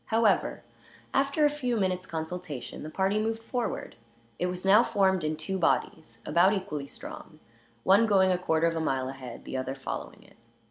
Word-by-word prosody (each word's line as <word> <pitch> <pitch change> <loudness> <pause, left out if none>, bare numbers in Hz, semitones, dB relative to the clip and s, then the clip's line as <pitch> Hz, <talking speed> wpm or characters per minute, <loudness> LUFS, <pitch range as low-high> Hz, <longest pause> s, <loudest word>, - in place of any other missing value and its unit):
However, 225 -2 +2 0.5
after 280 +3 +2
a - - +5
few 250 -5 -1
minutes' 185 -2 -1
consultation 160 -3 -5
the 155 - -6
party 195 +5 +1
moved 225 +1 -2
forward. 245 -1 -3 0.4
It 180 - +1
was 180 +1 -5
now 200 +4 +7
formed 190 -5 +2
in 155 0 -1
two 190 +5 -3
bodies, 160 -1 -1
about 175 +6 +4
equally 150 -8 -3
strong; 155 +2 -10 0.4
one 200 +4 +5
going 190 -3 +4
a 180 - +2
quarter 160 -2 +1
of 165 0 +1
a - - 0
mile 130 -4 0
ahead, 130 -3 -9
the - - -4
other 130 +1 -3
following 135 - -6
it. - - -21
185 Hz, 180 wpm, -28 LUFS, 155-210 Hz, 0.5 s, now